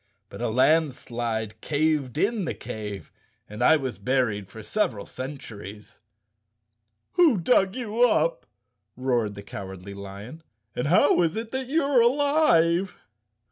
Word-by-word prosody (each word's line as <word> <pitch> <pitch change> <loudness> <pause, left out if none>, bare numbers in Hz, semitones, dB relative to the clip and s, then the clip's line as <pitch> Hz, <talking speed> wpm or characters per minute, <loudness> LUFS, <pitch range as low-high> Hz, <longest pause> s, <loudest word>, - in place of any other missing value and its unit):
But - - -9
a 120 - 0
landslide 120 -5 0
caved 150 -3 0
in 205 +2 +1
the - - -3
cave 105 -2 -7 0.4
and 105 +3 -4
I 160 +5 +6
was 130 -4 -5
buried 120 -7 0
for 110 +1 -10
several 110 - -1
centuries." 110 -7 -9 1.1
"Who 325 - +4
dug 190 +1 +2
you 235 -2 -3
up," 160 - 0 0.5
roared 120 -5 0
the 100 - -9
Cowardly 95 -1 -8
Lion, 100 +9 -9 0.3
"and 125 - -1
how 170 +1 +4
is 165 -2 +1
it 225 +1 -5
you 310 +4 +1
are 275 -3 +4
alive?" 235 - +3
135 Hz, 130 wpm, -25 LUFS, -, 1.1 s, I